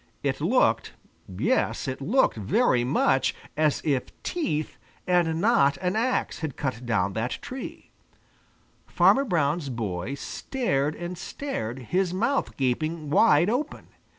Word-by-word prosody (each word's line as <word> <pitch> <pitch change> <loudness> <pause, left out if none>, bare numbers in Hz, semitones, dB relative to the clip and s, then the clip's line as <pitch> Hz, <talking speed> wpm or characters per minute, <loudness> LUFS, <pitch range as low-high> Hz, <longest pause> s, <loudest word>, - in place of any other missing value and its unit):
It - - -1
looked - - +2 0.3
yes, 95 +7 0
it 130 +1 -4
looked 250 - +2
very 120 - +2
much 130 +1 +2 0.2
as 155 -1 +1
if 140 -5 +1 0.2
teeth, 160 - -2 0.3
and 170 -3 +2
not 200 -9 +3
an 180 +2 -1
axe, 245 +4 0
had 155 -5 -4
cut 125 -3 -3
down 100 -4 +1
that 115 +4 -2
tree. 260 +1 -8 1.0
Farmer 275 +1 +4
Brown's 155 - 0
boy 110 0 -3
stared 150 - -2
and 175 0 -6
stared, 130 - -4 0.2
his 185 -1 +1
mouth 235 +8 0
gaping 150 +4 -1
wide 150 +2 +5
open. 250 +8 -2
155 Hz, 125 wpm, -26 LUFS, 130-190 Hz, 1.0 s, wide